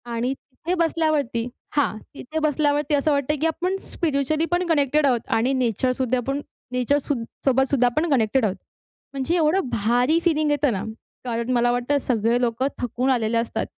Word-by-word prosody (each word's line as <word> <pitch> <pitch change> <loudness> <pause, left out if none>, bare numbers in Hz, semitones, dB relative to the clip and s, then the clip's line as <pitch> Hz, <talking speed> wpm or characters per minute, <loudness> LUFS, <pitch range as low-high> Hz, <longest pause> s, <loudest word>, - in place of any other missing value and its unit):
आणि 245 +3 0
तिथे 290 +6 -6
बसल्यावरती 310 -8 0 0.3
हां, 275 -7 +1 0.2
तिथे 315 +5 -4
बसल्यावरती 295 -1 +1
असं 290 +2 +1
वाटतंय, 280 +1 +1
की 320 +3 +1
आपण 365 +4 -1
स्पिरिच्युअली 310 0 0
पण 355 +1 +1
कनेक्टेड 295 -2 +2
आहोत 245 -3 +3 0.2
आणि 250 +4 +1
नेचरसुद्धा 255 +1 0
आपण 275 +4 -2 0.3
नेचर 250 +3 +1
सूद 275 -4 -2 0.2
सोबत 265 0 +3
सुद्धा 250 -3 +4
आपण 310 +7 0
कनेक्टेड 230 -1 +2
आहोत. 195 - -1 0.6
म्हणजे 275 +6 -1
एवढं 325 -2 +2
भारी 245 +9 +2
फीलिंग 310 -3 +2
येतं 290 -3 +2
ना. 195 +1 -3 0.4
कारण 235 0 -2
मला 240 0 +3
वाटतं, 245 +4 +1
सगळे 235 0 +1
लोकं 240 +3 0
थकून 245 +2 -1
आलेले 230 -2 +1
असतात. 230 0 -1
270 Hz, 165 wpm, -23 LUFS, 245-305 Hz, 0.6 s, सुद्धा